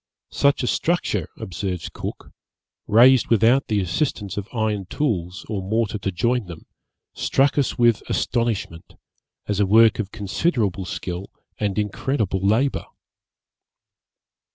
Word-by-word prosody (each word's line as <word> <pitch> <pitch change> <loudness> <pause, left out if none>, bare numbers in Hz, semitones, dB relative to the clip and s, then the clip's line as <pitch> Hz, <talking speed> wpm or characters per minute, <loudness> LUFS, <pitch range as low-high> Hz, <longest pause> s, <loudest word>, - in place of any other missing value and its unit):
Such 140 -1 +2
a - - 0
structure, 175 +7 0
observes 95 -4 -4
Cook, - - -7 0.6
raised 125 +3 +6
without 115 +4 +3
the 105 -2 +1
assistance 100 - -2
of 100 -1 -4
iron 110 -5 -1
tools, 90 - -2
or 105 -3 -3
mortar 105 +2 -1
to 100 0 -2
join 115 +4 0
them, 85 -2 -10 0.5
struck 135 +1 +1
us 140 -3 0
with 120 -2 +3
astonishment, 110 -8 -2 0.5
as 105 -1 -1
a 100 - +3
work 110 +3 +5
of 100 -3 -2
considerable 105 - -1
skill 90 0 -5 0.3
and 105 -2 -1
incredible 105 -1 -1
labour. 110 +8 +1
105 Hz, 125 wpm, -22 LUFS, 95-120 Hz, 0.6 s, raised